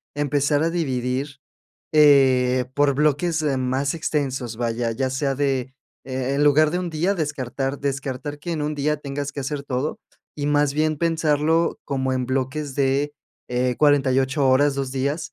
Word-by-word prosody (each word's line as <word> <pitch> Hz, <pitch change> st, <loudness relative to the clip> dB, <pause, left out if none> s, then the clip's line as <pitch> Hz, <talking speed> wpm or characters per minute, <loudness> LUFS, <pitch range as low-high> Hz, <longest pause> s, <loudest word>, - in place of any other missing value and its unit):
empezar 145 Hz, 0 st, +1 dB
a 165 Hz, -, +2 dB
dividir, 135 Hz, -3 st, -2 dB, 0.5 s
eh, 130 Hz, -4 st, +5 dB
por 145 Hz, -1 st, +3 dB
bloques, 155 Hz, +3 st, +1 dB
am, 135 Hz, -3 st, 0 dB
más 135 Hz, +4 st, 0 dB
extensos, 135 Hz, -7 st, -2 dB
vaya, 115 Hz, 0 st, -1 dB
ya 130 Hz, +3 st, -1 dB
sea 135 Hz, 0 st, -1 dB
de, 135 Hz, -2 st, +1 dB
eh 130 Hz, +1 st, -10 dB, 0.3 s
eh, 130 Hz, +1 st, -2 dB
en 145 Hz, -, +1 dB
lugar 150 Hz, +1 st, +5 dB
de 180 Hz, -, 0 dB
un 175 Hz, -, -4 dB
día, 170 Hz, +5 st, 0 dB
descartar 140 Hz, -4 st, -3 dB
descartar 140 Hz, +1 st, -4 dB
que 170 Hz, -, -5 dB
en 155 Hz, -2 st, -2 dB
un 150 Hz, 0 st, -2 dB
día 150 Hz, +1 st, 0 dB
tengas 140 Hz, 0 st, -5 dB
que -, -, -9 dB
hacer 140 Hz, +1 st, -3 dB
todo, 130 Hz, +2 st, -3 dB, 0.4 s
y 145 Hz, -1 st, -2 dB
más 145 Hz, -1 st, +2 dB
bien, 155 Hz, 0 st, +1 dB
pensarlo 160 Hz, 0 st, +1 dB
como 130 Hz, -1 st, -1 dB
en 130 Hz, -1 st, -1 dB
bloques 135 Hz, +2 st, -2 dB
de, 140 Hz, +1 st, +1 dB, 0.4 s
eh, 125 Hz, 0 st, 0 dB
48 135 Hz, -1 st, +3 dB
horas, 140 Hz, +2 st, +4 dB
2 135 Hz, -2 st, -3 dB
días, 140 Hz, +4 st, -2 dB
140 Hz, 170 wpm, -23 LUFS, 130-150 Hz, 0.5 s, eh